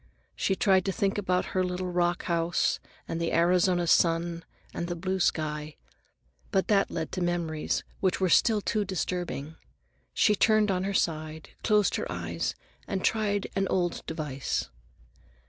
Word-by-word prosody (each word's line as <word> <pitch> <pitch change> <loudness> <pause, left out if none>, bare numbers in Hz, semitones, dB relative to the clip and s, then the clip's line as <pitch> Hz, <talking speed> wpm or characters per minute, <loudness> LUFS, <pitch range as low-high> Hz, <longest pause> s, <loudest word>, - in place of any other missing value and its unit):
She 190 - 0
tried 190 -1 +3
to 195 - +1
think 195 +1 0
about 185 -2 0
her 185 - +2
little 180 0 -3
rock 175 0 +1
house 170 0 +1 0.3
and 165 - -3
the 170 - 0
Arizona 175 +1 +3
sun 170 0 +2 0.3
and 170 - -3
the 175 - -3
blue 185 +2 -2
sky. 150 -3 -1 0.7
But 190 - 0
that 200 -2 +3
led 160 -2 -4
to 185 - -3
memories 170 -3 -1 0.2
which 185 -2 +1
were 190 - +2
still 215 +4 +4
too 210 +1 0
disturbing. 175 -5 -3 0.5
She 210 - +3
turned 215 0 +3
on 185 0 0
her 200 - -1
side, 155 -2 -1
closed 210 -2 +3
her - - -4
eyes, - - -3 0.3
and 190 -2 -2
tried 205 -2 +1
an 195 0 +1
old 175 -2 -1
device. 150 - -3
180 Hz, 155 wpm, -28 LUFS, 165-195 Hz, 0.7 s, still